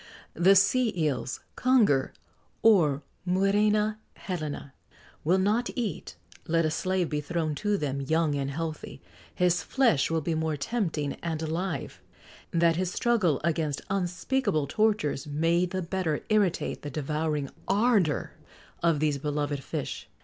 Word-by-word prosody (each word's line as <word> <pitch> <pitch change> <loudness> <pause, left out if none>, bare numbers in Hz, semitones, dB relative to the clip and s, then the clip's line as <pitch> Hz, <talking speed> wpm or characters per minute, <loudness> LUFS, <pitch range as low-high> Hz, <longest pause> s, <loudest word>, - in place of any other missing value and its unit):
The 185 +4 +5
sea 220 +5 +4
eels 140 -7 -1
(conger, 220 - +3 0.5
or 155 -10 +4 0.2
muræna 210 +3 +2 0.2
helena) 155 -6 -5 0.5
will 175 +5 +3
not 210 +6 +1
eat; 205 - -4 0.3
let 165 0 +2
a 155 - +1
slave 185 +2 0
be 150 -1 -2
thrown 160 0 -2
to 210 -1 +1
them, 140 -4 -2
young 160 +2 +1
and 140 -1 -1
healthy, 155 0 -5 0.4
his 175 -1 +2
flesh 235 - +2
will 165 0 0
be 165 +2 -1
more 160 -1 -1
tempting 160 -5 -2
and 165 -2 -3
alive, 170 +4 -3 0.5
that 170 -1 +2
his 185 0 -1
struggle 210 - +2
against 160 -3 -1
unspeakable 185 - 0
tortures 160 -4 0
may 165 +4 +1
the 185 +1 -3
better 170 -3 -1
irritate 205 -5 +1
the 145 - -5
devouring 150 0 -2 0.2
ardour 200 -6 +2 0.5
of 165 -3 +2
these 150 -2 +1
beloved 145 -1 -2
fish. - - -5
165 Hz, 135 wpm, -28 LUFS, 150-195 Hz, 0.5 s, The